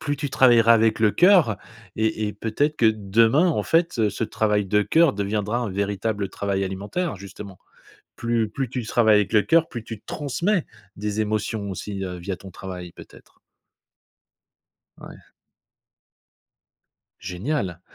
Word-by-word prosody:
plus 145 -1 -2
tu 145 0 -3
travailleras 120 -3 +5
avec 110 0 +2
le 110 -2 +4
cœur 175 - +4 0.4
et 110 0 0
et - - -5
peut-être 115 +9 -1
que 115 - +3
demain, 110 - +3
en 165 - 0
fait, 165 -10 +1
ce 110 +3 -3
travail 105 -2 0
de 105 +2 +2
cœur 160 +6 +3
deviendra 105 +3 -2
un 120 -4 -3
véritable 100 +1 -2
travail 100 0 -2
alimentaire, 100 - -3
justement. 95 0 -10 0.6
Plus 115 -2 -1
plus 135 0 -4
tu 125 -2 -4
travailles 110 -2 +3
avec 105 +1 +1
le 105 - +5
cœur, 165 0 +3
plus 120 -2 -7
tu 110 -2 -8
transmets 160 - -1 0.3
des 105 +1 -2
émotions 105 -1 -2
aussi, 95 +1 -5
heu, 90 -1 -5
via 90 +2 -5
ton 95 - -12
travail, 90 -2 -8
peut-être. - - -16 1.6
Ouais. - - -12 2.0
Génial. 95 - -3
110 Hz, 145 wpm, -23 LUFS, 100-125 Hz, 2.0 s, travailleras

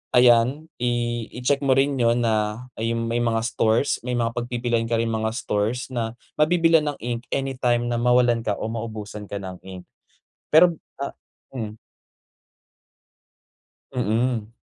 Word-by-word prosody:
ayan 125 +6 +4
i 120 -1 -1
icheck 130 +3 +1
mo 135 -2 +2
rin 135 0 +2
yun 120 0 +3
na, 110 +2 0
ayun 115 +1 -1
may 115 +1 -1
mga 115 -1 +1
stores 115 +3 +1
may 125 0 -3
mga 115 -1 0
pagpipilian 120 -1 -1
ka 115 - +1
ring 115 0 0
mga 110 0 0
stores 115 +2 -1
na 115 -1 -3 0.2
mabibilhan 165 -1 +4
ng 145 - -1
ink 120 0 -4
anytime 125 -3 0
na 120 - 0
mwawalan 125 -1 +4
ka 110 -3 -1
or 110 - -4
maubusan 110 -2 -6
ka 100 - -6
ng 95 -1 -7
ink. 95 -1 -9 0.7
Pero, 170 +2 +6 0.2
ah 140 - -4 0.4
mm. 110 -3 -5 2.1
Mm. 115 -2 -1
120 Hz, 145 wpm, -24 LUFS, 115-125 Hz, 2.1 s, Pero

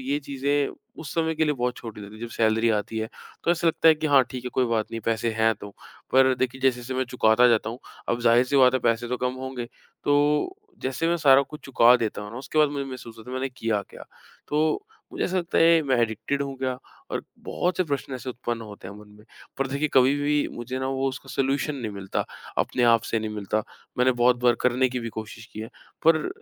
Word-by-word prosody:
ये 140 +3 -1
चीज़ें 140 +1 0 0.3
उस 155 -4 -7
समय 160 -1 +1
के 160 0 +2
लिए 150 - +2
बहुत 125 -1 -2
छोटी 110 -3 -8
लगती 100 +1 -10
हैं 110 - -12
जब 120 - -4
सैलरी 110 +1 +2
आती 110 +1 -1
है, 110 - -3 0.4
तो - - +3
ऐसा 170 0 +1
लगता 165 0 +4
है 160 - +8
कि 155 0 -3
हाँ 140 -2 +6
ठीक 125 -1 -6
है, 125 - -4
कोई 130 - +3
बात 115 -2 0
नहीं 115 - -4
पैसे 115 0 0
हैं 110 0 +2
तो। 100 0 -10 0.4
पर 130 0 +5
जैसे-जैसे 130 -1 0
मैं 130 0 0
चुकाता 120 -1 +4
जाता 115 -1 +2
हूँ, 120 - -7 0.3
अब 120 - 0
ज़ाहिर-सी 120 +3 +4
बात 130 -1 +6
है - - +3
पैसे 115 +1 +1
तो 125 - -1
कम 125 0 -1
होंगे। 130 -2 -4 0.4
तो 150 - +2 0.3
जैसे 135 +5 -1
मैं 170 - +2
सारा 140 -4 +6
कुछ 150 +3 -10
चुका 125 -2 +6
देता 110 -3 -3
हूँ 105 - -8
ना, 120 - -6
उसके 140 +3 -3
बाद 150 -1 +6
मुझे 140 -1 -3
महसूस 130 -4 -9
होता 125 +3 -10
है - - -5
मैंने 135 +1 -1
किया 115 -5 -2
क्या। - - -11 0.4
तो 155 - +1 0.3
मुझे - - -2
ऐसा 185 - -1
लगता 175 -1 -1
है 165 0 +6
मैं 135 -3 +1
एडिकटिड 115 +5 -1
हूँ 135 -1 -5
क्या 130 -1 -2 0.3
और - - -2 0.2
बहुत 180 -1 -1
से 185 - +2
प्रश्न 140 -3 -3
ऐसे 130 0 -6
उत्पन्न 120 -1 -4
होते 105 -3 -10
हैं 100 - -9
मन 105 - -14
में। 105 - -17 0.3
पर 135 - +1
देखिए 140 +3 -1
कभी 130 +1 +5
भी 145 0 +1
मुझे 125 +2 -5
ना 130 - -2
वो 135 0 0
उसका 135 +1 -8
सोल्यूशन 140 +2 0
नहीं 115 -5 -4
मिलता, 95 -1 -3 0.3
अपने 125 - 0
आप 115 -1 +5
से 115 - -1
नहीं 110 0 -4
मिलता, 105 +1 -1 0.4
मैंने 130 +1 +4
बहुत 125 0 +3
बार 120 -1 +5
करने 125 +1 +2
की 125 0 -3
भी 115 - -4
कोशिश 110 0 -8
की 110 - -7
है। 110 - -6 0.4
पर 160 -1 +4
130 Hz, 240 wpm, -25 LUFS, 115-140 Hz, 0.4 s, है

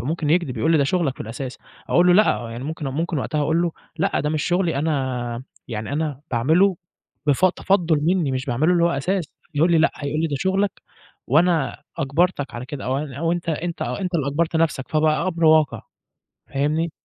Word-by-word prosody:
ممكن 150 +3 -2
يكدب 160 -7 +1
يقول 160 +9 +2
لي 160 - +4
ده 140 - +3
شغلك 155 -3 0
في - - -17
الأساس، 125 +4 -6 0.3
أقول 175 +1 +4
له 180 - +6
لأ 180 - +3
يعني 120 +3 -6
ممكن 155 -1 -4
ممكن 160 +3 -2
وقتها 150 +3 -2
أقول 160 +4 +2
له: 170 -2 0 0.2
"لأ 195 +4 0
ده 150 +1 -1
مش 155 -2 -1
شغلي 175 -3 +1
أنا 130 -5 -2 0.3
يعني 110 +3 -4
أنا 150 -3 -2
باعمله 160 +11 +3 0.5
بف 145 +4 +3
تفضُّل 180 -3 +2
مني 165 -2 +1
مش 130 +1 -3
باعمله 145 +8 +2
اللي 170 -1 +3
هو 170 - +3
أساس،" 175 +5 -1 0.3
يقول 165 +4 +3
لي: 165 - +5
"لأ" 165 - +4
هيقول 145 +1 -2
لي: 165 - +1
"ده 145 -3 -2
شغلك 190 +2 0 0.4
وأنا 160 -2 +2 0.2
أجبرتك 145 0 0
على 120 +2 -6
كده" 140 0 -6
أو 130 +2 0
أن 145 -3 -5
أو 165 +4 0
أنت 175 -1 -4
أنت 165 +2 -2
أنت 185 -2 -3
اللي 150 -5 +1
أجبرت 160 +3 0
نفْسك، 155 -5 0
فبقى 155 +3 +2
أمر 170 -2 -1
واقع. 155 -2 +4 0.7
فاهمني؟ 155 +4 0
155 Hz, 200 wpm, -22 LUFS, 135-170 Hz, 0.7 s, له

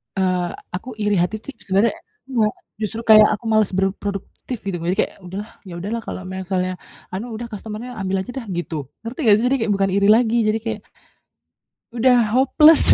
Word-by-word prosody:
Eee, 185 -2 +1 0.3
aku 225 +8 -6
iri 210 0 +2
hati 200 +5 -2
tuh - - -7
i - - -39
sebenarnya 200 +4 +3 0.4
enggak, 225 -5 +2 0.3
justru 220 +2 -2
kayak 215 -1 +9
aku 230 - -15
malas 215 -3 +3
berproduktif 195 +5 -3
gitu. 195 -3 -2
Jadi 175 +3 -1
kayak, - - +1
"Udahlah, 200 +5 -6 0.2
ya 180 - -8
udahlah 215 +6 -3
kalau - - -5
misalnya 185 -1 -1 0.4
anu, 195 +5 -3
udah 235 +2 -5
customer-nya 215 +3 -6
ambil 190 0 -1
saja 245 - -8
dah." - - -12
Gitu. 175 -1 -3 0.3
Ngerti 235 +5 -7
enggak 210 -2 +7
sih? 245 - +1
Jadi - - +4
kayak 215 - 0
bukan 195 0 +1
iri 200 0 +3
lagi, 235 0 +2
jadi 215 +1 +1
kayak 225 -2 -3 1.2
udah 245 +1 +5 0.2
hopeless. 300 +4 +6
210 Hz, 185 wpm, -21 LUFS, 190-230 Hz, 1.2 s, kayak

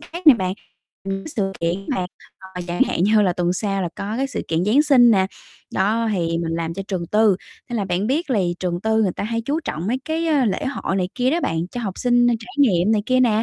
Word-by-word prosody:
khác 345 0 -9
nè 295 - +10
bạn, 185 -4 -2 0.5
những 195 +6 -4
sự 195 -8 -2
kiện 170 +1 +1
mà, 180 - -1 0.5
à, 180 - -4
chẳng 175 0 +1
hạn 175 - +1
như 210 +1 +4
là 185 -3 +2
tuần 175 0 0
sau 195 0 -1
là 175 - -1
có 210 +3 -4
cái 270 +2 0
sự - - -4
kiện 165 +2 0
Giáng 245 +8 +4
sinh 255 -6 +6
nè. 190 -3 +3 0.5
Đó 220 +4 +1
thì 165 -3 0
mình 165 -1 -2
làm 165 0 -3
cho 195 - -4
trường 180 -4 -2
tư, 210 0 +3 0.3
nên 240 - -2
là 205 - 0
bạn 185 +2 -1
biết 290 +5 -1
lì 185 -7 +1
trường 175 -1 -2
tư 220 +2 +2
người 190 -4 +1
ta - - -4
hay 230 +2 -1
chú 285 +7 -2
trọng 165 - -4
mấy 245 +5 0
cái, 325 +1 -1
ơ, 290 -5 +3
lễ 200 - -1
hội 260 -7 -2
này 180 -1 0
kia 255 0 +1
đó 335 +4 +1
bạn, 165 - -1
cho 245 - -5
học 195 -5 -4
sinh 245 -1 +3
trải 235 +1 -3
nghiệm 210 -6 +4
này 210 - +1
kia 255 0 +3
nè. 225 -3 +3
210 Hz, 260 wpm, -21 LUFS, 180-245 Hz, 0.5 s, nè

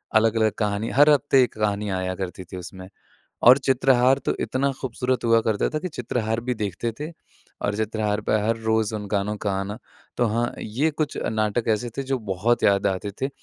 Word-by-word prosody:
अलग-अलग 110 0 +3
कहानी, 105 +1 -1
हर 145 +2 +6
हफ़्ते 135 -2 +4
एक - - -2
कहानी 105 -1 0
आया 95 -1 -2
करती 95 -1 -5
थी 90 - -9
उसमें 95 +1 -9 0.6
और 130 +2 +9
चित्रहार 130 0 +3
तो - - +1
इतना 140 +2 0
ख़ूबसूरत 125 0 -2
हुआ 115 0 +4
करता 110 -2 +1
था 155 - -1
कि 185 - -3
चित्रहार 115 -5 -2
भी 125 - +1
देखते 105 +2 -3
थे। 155 +2 -4 0.5
और 100 - 0
चित्रहार 110 -1 -1
पे - - -1
हर 115 +1 +1
रोज़ 110 -1 0
उन 105 -1 -6
गानों 105 +1 -1
का 105 - 0
आना। 100 +2 -4 0.4
तो 120 - +2
हाँ, 115 +2 0
ये 130 +9 0
कुछ 150 0 -3 0.2
नाटक 110 +1 0
ऐसे 110 +2 0
थे - - 0
जो 135 -1 -1
बहुत 110 +3 0
याद 100 0 +3
आते 95 +1 -1
थे। 135 - +1
110 Hz, 195 wpm, -24 LUFS, 105-125 Hz, 0.6 s, और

